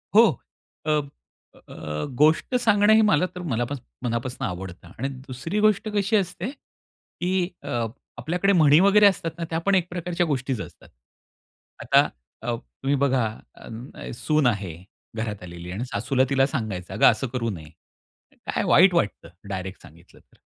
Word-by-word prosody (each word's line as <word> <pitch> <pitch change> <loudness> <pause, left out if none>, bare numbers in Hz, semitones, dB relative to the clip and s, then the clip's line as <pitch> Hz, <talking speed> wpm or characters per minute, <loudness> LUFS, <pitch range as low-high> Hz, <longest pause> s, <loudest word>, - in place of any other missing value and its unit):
हो. 225 +2 +9 0.6
अब 150 -2 +1 0.5
अ, 75 0 -6
गोष्ट 155 - +3
सांगणं 215 -3 +4
हे 220 - +6
मला 195 -6 +4
तर 180 - -5
मलापास 130 -3 -2 0.3
मनापासून 120 +1 -2
आवडतं 90 -1 -8
आणि 135 - -2 0.2
दुसरी 140 +10 -3
गोष्ट 215 0 +3
कशी 205 +2 +1
असते, 190 +1 -1
की 185 -9 -5 0.2
अ, 120 -5 -1 0.3
आपल्याकडे 175 +10 +1
म्हणी 155 -4 +6
वगैरे 200 +2 +6
असतात 185 -4 0
ना 170 - -4
त्या 165 - -1
पण 200 0 +4
एक 180 -2 +2
प्रकारच्या 175 0 -1
गोष्टीचं 130 - -2
असतात. - - -17 0.9
आता - - +5 0.4
अ, 120 +1 -1
तुम्ही 135 +4 -3
बघा, 135 -3 +2 0.3
अ, 115 +4 -9
सून 150 +3 +2
आहे 100 -8 -1 0.4
घरात 105 -4 -4
आलेली 85 0 -8
आणि 105 +7 -3
सासूला 130 0 0
तिला 135 -1 +3
सांगायचं, 110 -9 -4
"अगं, - - +3
असं 125 +4 -3
करू 120 -1 -2
नये." 80 -7 -7 0.8
काय - - -1
वाईट 180 +4 +6
वाटतं 105 - -1 0.2
डायरेक्ट 95 0 -5
सांगितलं 85 +3 -17
तर, - - -29
140 Hz, 150 wpm, -24 LUFS, 115-180 Hz, 0.9 s, हो